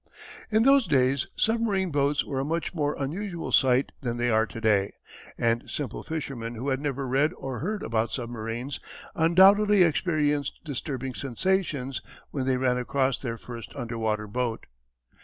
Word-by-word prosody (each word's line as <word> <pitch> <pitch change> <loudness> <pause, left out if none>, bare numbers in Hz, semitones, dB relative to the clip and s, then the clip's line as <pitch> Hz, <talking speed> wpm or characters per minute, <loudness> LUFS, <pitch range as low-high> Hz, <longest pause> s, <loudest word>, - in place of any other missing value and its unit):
In 220 0 +3
those 275 -2 +5
days 135 -2 +2
submarine 215 -5 +1
boats 145 0 +1
were 135 -2 -3
a - - 0
much 165 +5 -2
more 150 -3 0
unusual 170 +5 -4
sight 130 0 +4
than 120 -3 -2
they 120 0 +1
are 110 0 +3
to 115 - -8
day 105 -3 +2 0.4
and 115 0 0
simple 145 -3 -4
fishermen 135 -7 -5
who 125 +5 -3
had 130 0 0
never 140 -2 -2
read 140 +6 +2
or 130 -3 -5
heard 210 +6 -3
about 115 0 0
submarines 120 +2 -4 0.3
undoubtedly 190 +4 +6
experienced 150 -3 +1
disturbing 135 -2 -4
sensations 140 -2 -1 0.3
when 135 -3 -2
they 130 -1 +2
ran 125 -1 +1
across 130 +1 0
their 115 -3 -4
first 115 0 -9
underwater 110 -2 -2
boat. 115 +2 -3
135 Hz, 155 wpm, -27 LUFS, 120-160 Hz, 0.4 s, undoubtedly